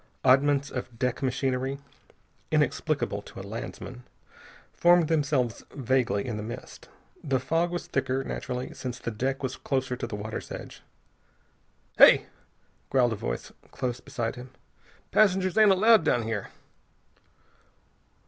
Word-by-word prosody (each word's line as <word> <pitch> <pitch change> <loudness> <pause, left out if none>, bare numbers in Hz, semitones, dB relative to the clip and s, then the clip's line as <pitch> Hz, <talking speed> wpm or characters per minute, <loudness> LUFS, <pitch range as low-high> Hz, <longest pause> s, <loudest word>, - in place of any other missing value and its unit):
Oddments 140 +2 +4
of 125 -2 -6
deck 125 +1 -1
machinery, 130 0 -1 0.7
inexplicable - - 0
to - - -12
a - - -7
landsman, 125 0 -7 0.7
formed 175 -2 +4
themselves 140 -8 0
vaguely 130 -5 +1
in 115 -4 -3
the - - -4
mist. 120 +4 -9 0.3
The 135 -3 +1
fog 165 +7 0
was 175 0 -4
thicker, 130 0 -1
naturally, 125 -1 -4
since 125 -1 -5
the 120 - -4
deck 135 +5 -2
was 130 0 -3
closer 130 -2 -1
to 120 - -4
the 115 - -5
water's 110 +2 -6
edge. - - -8 1.2
"Hey!" - - +8 0.6
growled 125 -3 +3
a - - -2
voice - - -4 0.2
close 125 -1 -3
beside 125 -3 -4
him. 125 +1 -9 0.6
"Passengers 190 -3 +3
ain't 215 -1 +6
allowed 215 +3 +6
down 120 - +2
here." 110 -2 -3
130 Hz, 130 wpm, -27 LUFS, 120-145 Hz, 1.2 s, Hey